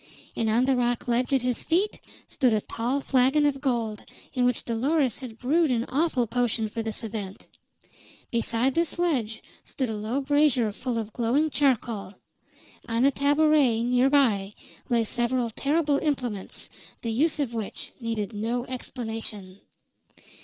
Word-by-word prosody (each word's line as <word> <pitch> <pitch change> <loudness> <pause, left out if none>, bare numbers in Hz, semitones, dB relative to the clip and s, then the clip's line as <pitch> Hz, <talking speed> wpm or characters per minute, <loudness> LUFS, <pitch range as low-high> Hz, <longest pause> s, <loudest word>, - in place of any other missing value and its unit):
And 225 -1 0
on 235 +4 +3
the 265 0 +3
rock 245 -1 0
ledge 245 +2 +1
at 265 -2 +2
his 250 -1 0
feet 375 +6 +1 0.3
stood 250 -4 +2
a 215 - +1
tall 245 +7 -2
flagon 270 +3 +3
of 275 -2 0
gold, 230 -6 -1 0.3
in 250 -2 +2
which 250 -1 0
Dolores 260 +2 +1
had 245 -5 -8
brewed 305 +6 +2
an 240 -2 +1
awful 275 -4 +1
potion 230 -1 0
for 225 +2 -4
this 225 +1 -4
event. 205 -3 -6 0.9
Beside 235 +2 +1
this 335 +2 0
ledge 260 -11 0 0.2
stood 260 -4 -3
a - - -3
low 215 +6 -2
brazier 280 -5 +2
full 240 +3 -3
of 220 -2 -4
glowing 265 +7 +1
charcoal; 230 -9 0 0.7
on 230 +3 +2
a 280 - +5
tabouret 285 -4 +3
near 250 +2 +3
by 210 -8 +2 0.3
lay 235 -2 +3
several 240 +1 0
terrible 290 +3 +1
implements 250 -10 -3 0.3
the 230 - -1
use 300 +9 +2
of 265 -5 -1
which 220 -3 -5
needed 225 -3 -3
no 230 +4 -2
explanation. 220 -6 -6
245 Hz, 155 wpm, -26 LUFS, 225-275 Hz, 0.9 s, a